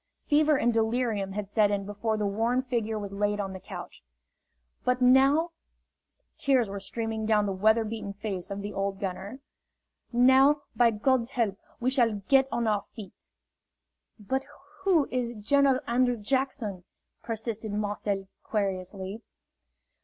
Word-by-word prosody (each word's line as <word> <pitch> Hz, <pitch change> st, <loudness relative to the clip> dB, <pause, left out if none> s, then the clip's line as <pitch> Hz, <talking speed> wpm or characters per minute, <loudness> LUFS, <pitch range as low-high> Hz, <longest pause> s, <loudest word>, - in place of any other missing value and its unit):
Fever 300 Hz, 0 st, +4 dB
and 240 Hz, -2 st, +2 dB
delirium 220 Hz, -3 st, 0 dB
had 210 Hz, 0 st, -3 dB
set 205 Hz, +1 st, +2 dB
in 200 Hz, -1 st, -1 dB
before 210 Hz, +2 st, -2 dB
the 210 Hz, -, -1 dB
worn 230 Hz, +5 st, +1 dB
figure 230 Hz, -4 st, -2 dB
was 200 Hz, -2 st, -5 dB
laid 205 Hz, +1 st, 0 dB
on 195 Hz, -1 st, -3 dB
the 190 Hz, -, -7 dB
couch. 190 Hz, -, -9 dB, 0.8 s
"But 250 Hz, 0 st, +1 dB
now," 270 Hz, +6 st, +5 dB, 0.9 s
tears 260 Hz, -5 st, +3 dB
were 200 Hz, 0 st, -5 dB
streaming 220 Hz, +2 st, -3 dB
down 210 Hz, -2 st, +3 dB
the 200 Hz, -, -1 dB
weather 220 Hz, +4 st, +3 dB
beaten 215 Hz, -2 st, -5 dB
face 200 Hz, -3 st, -5 dB
of 200 Hz, 0 st, -5 dB
the 205 Hz, -, -5 dB
old 195 Hz, 0 st, -2 dB
gunner, 200 Hz, +6 st, -5 dB, 0.7 s
"now, 265 Hz, +4 st, +5 dB
by 240 Hz, -1 st, +5 dB
God's 235 Hz, +2 st, +1 dB
help, 225 Hz, -7 st, -1 dB, 0.2 s
we 250 Hz, +2 st, +1 dB
shall 230 Hz, -6 st, +1 dB
get 270 Hz, -1 st, +5 dB
on 235 Hz, -, 0 dB
our 210 Hz, -2 st, +1 dB
feet!" 205 Hz, -5 st, -11 dB, 0.9 s
"But 265 Hz, +6 st, -2 dB, 0.4 s
who 345 Hz, -7 st, +3 dB
is 240 Hz, -2 st, -2 dB
General 265 Hz, +5 st, +3 dB
Andrew 245 Hz, 0 st, +2 dB
Jackson?" 225 Hz, -4 st, -1 dB, 0.4 s
persisted 225 Hz, -1 st, -4 dB
Marcel, 205 Hz, -1 st, -2 dB, 0.2 s
querulously. 195 Hz, 0 st, -3 dB
220 Hz, 145 wpm, -28 LUFS, 205-250 Hz, 0.9 s, now